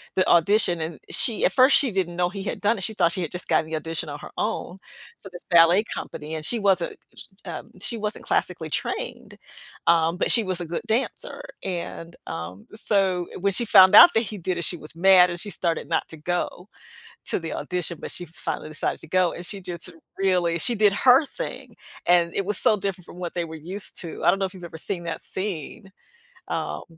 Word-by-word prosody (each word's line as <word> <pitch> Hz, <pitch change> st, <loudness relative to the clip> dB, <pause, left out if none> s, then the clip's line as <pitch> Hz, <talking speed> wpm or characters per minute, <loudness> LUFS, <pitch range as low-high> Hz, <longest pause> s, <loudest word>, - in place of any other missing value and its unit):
the 185 Hz, -, +2 dB
audition, 175 Hz, 0 st, +4 dB
and 160 Hz, -1 st, -5 dB
she 225 Hz, -4 st, +2 dB
at -, -, +4 dB
first, 260 Hz, +2 st, +6 dB
she 265 Hz, -6 st, +3 dB
didn't 180 Hz, -3 st, -2 dB
know 175 Hz, 0 st, +1 dB
he 195 Hz, 0 st, -7 dB
had -, -, -4 dB
done 210 Hz, +2 st, +2 dB
it, 190 Hz, -, -5 dB
she 220 Hz, -, 0 dB
thought 170 Hz, -5 st, +2 dB
she 185 Hz, -, -1 dB
had 160 Hz, -, -5 dB
just 180 Hz, -, -5 dB
gotten 160 Hz, -, +2 dB
the 160 Hz, 0 st, -5 dB
audition 160 Hz, 0 st, -3 dB
on 145 Hz, -, -7 dB
her -, -, -10 dB
own 210 Hz, -4 st, -3 dB, 0.5 s
for 195 Hz, -, -9 dB
this 175 Hz, -, -10 dB
ballet 170 Hz, +3 st, +6 dB
company, 155 Hz, -7 st, -7 dB
and 155 Hz, -, -5 dB
she 235 Hz, +6 st, +1 dB
wasn't, 190 Hz, -4 st, +1 dB, 0.5 s
um 170 Hz, -3 st, -7 dB
she 230 Hz, -, +2 dB
wasn't 210 Hz, 0 st, -4 dB
classically -, -, -1 dB
trained, -, -, -4 dB, 0.5 s
um, 165 Hz, +1 st, +3 dB
but -, -, 0 dB
she 230 Hz, -, +5 dB
was 185 Hz, -2 st, 0 dB
a 170 Hz, -, -5 dB
good 170 Hz, -, -4 dB
dancer, 265 Hz, -, -2 dB, 0.2 s
and, 170 Hz, -2 st, -5 dB
um, 85 Hz, +4 st, -7 dB
so 195 Hz, -5 st, +1 dB
when 200 Hz, +2 st, +1 dB
she 235 Hz, -, 0 dB
found 190 Hz, -3 st, +7 dB
out 350 Hz, 0 st, +10 dB
that -, -, +4 dB
he 215 Hz, -2 st, -6 dB
did 180 Hz, 0 st, -2 dB
it, -, -, +1 dB
she 175 Hz, -, +3 dB
was 155 Hz, 0 st, -12 dB
mad 180 Hz, 0 st, +6 dB
and 175 Hz, -, -5 dB
she 205 Hz, -, -2 dB
started 170 Hz, -4 st, -2 dB
not -, -, 0 dB
to 160 Hz, -, -7 dB
go 175 Hz, +3 st, -3 dB, 0.6 s
to -, -, 0 dB
the 165 Hz, -1 st, -6 dB
audition, 180 Hz, -2 st, -2 dB
but -, -, -6 dB
she 175 Hz, -, -6 dB
finally 155 Hz, -1 st, -5 dB
decided 155 Hz, -, -2 dB
to -, -, -12 dB
go, 185 Hz, +1 st, +2 dB
and 175 Hz, -, -8 dB
she 195 Hz, 0 st, -4 dB
just 175 Hz, -1 st, -5 dB, 0.3 s
really 180 Hz, -3 st, +1 dB
she 235 Hz, +8 st, +3 dB
did 210 Hz, -2 st, +4 dB
her 255 Hz, +7 st, +5 dB
thing, -, -, -7 dB, 0.3 s
and 175 Hz, -1 st, +3 dB
it 195 Hz, -, 0 dB
was 205 Hz, +1 st, 0 dB
so 215 Hz, -, +4 dB
different 190 Hz, -3 st, -4 dB
from -, -, -13 dB
what 175 Hz, -2 st, -5 dB
they 175 Hz, -1 st, -2 dB
were 160 Hz, -, -9 dB
used 185 Hz, +6 st, -6 dB
to, 170 Hz, -, -7 dB
I -, -, +4 dB
don't 195 Hz, -, 0 dB
know 195 Hz, -, 0 dB
if 190 Hz, -, -11 dB
you've 180 Hz, -, -10 dB
ever 170 Hz, -, -8 dB
seen 175 Hz, 0 st, -3 dB
that 165 Hz, -1 st, -4 dB
scene, 190 Hz, +1 st, -5 dB, 0.6 s
um -, -, -3 dB
180 Hz, 225 wpm, -24 LUFS, 170-200 Hz, 0.6 s, out